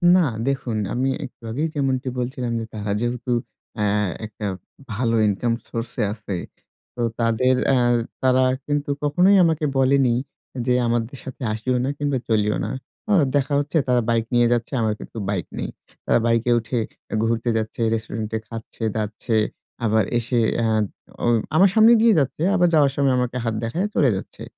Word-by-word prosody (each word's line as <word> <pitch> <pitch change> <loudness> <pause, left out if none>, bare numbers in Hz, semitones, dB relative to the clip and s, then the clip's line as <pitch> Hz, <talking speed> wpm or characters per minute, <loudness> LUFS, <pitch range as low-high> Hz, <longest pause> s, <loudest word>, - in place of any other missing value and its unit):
না, - - +6 0.3
দেখুন 130 -5 -1 0.2
আমি 130 +2 0 0.2
একটু 125 - -14
আগেই 150 +7 -1
যেমনটি 135 -2 0
বলছিলাম 125 -1 -3
যে 115 - -4
তারা 105 -1 -3
যেহেতু 120 +1 -2 0.4
অ্যা 105 -2 0 0.4
একটা 105 0 -7 0.5
ভালো 115 +2 0
ইনকাম 115 +4 0 0.2
সোর্সে 115 +1 -4
আছে। 105 -3 -5 0.6
তো 120 - -4 0.2
তাদের 120 +3 +2
অ্যা 135 -2 +4 0.4
তারা 130 0 +4 0.2
কিন্তু 145 -1 -1
কখনোই 180 +7 +4
আমাকে 160 -2 +1
বলেনি 135 -2 +4 0.5
যে 125 - +2
আমাদের 120 +3 -1
সাথে 130 - -9
আসিও 125 +4 -1
না - - 0
কিংবা 145 -2 0
চলিও 105 -1 +2
না। - - -3 0.4
অ - - +5 0.2
দেখা 140 0 +1
হচ্ছে 145 +3 -1
তারা 125 -1 +3
বাইক 115 -1 +2
নিয়ে 120 0 +4
যাচ্ছে, 120 +3 -2
আমার 110 -1 +1
কিন্তু - - -10
বাইক 95 -5 -1
নেই। - - -3 0.4
তারা - - +3
বাইকে 115 +1 +2
উঠে 115 +2 -3 0.4
এ - - +1
ঘুরতে 115 +1 0
যাচ্ছে, 110 +1 -3
রেস্টুরেন্টে 110 0 -3
খাচ্ছে-দাচ্ছে, 110 -1 -3 0.5
আবার 110 0 +3
এসে 120 +1 0 0.2
আ - - +2 0.6
ও - - +1 0.3
আমার 190 +4 +6
সামনে 220 +1 +7
দিয়েই 230 -2 +5
যাচ্ছে, 145 +3 -1
আবার 175 -2 +4
যাওয়ার 145 -3 +5
সময় 140 -2 +2
আমাকে 125 0 -1
হাত 115 - 0
দেখাইয়া 170 - -1
চলে 140 -5 +4
যাচ্ছে। 95 - -7
120 Hz, 165 wpm, -22 LUFS, 115-135 Hz, 0.6 s, সামনে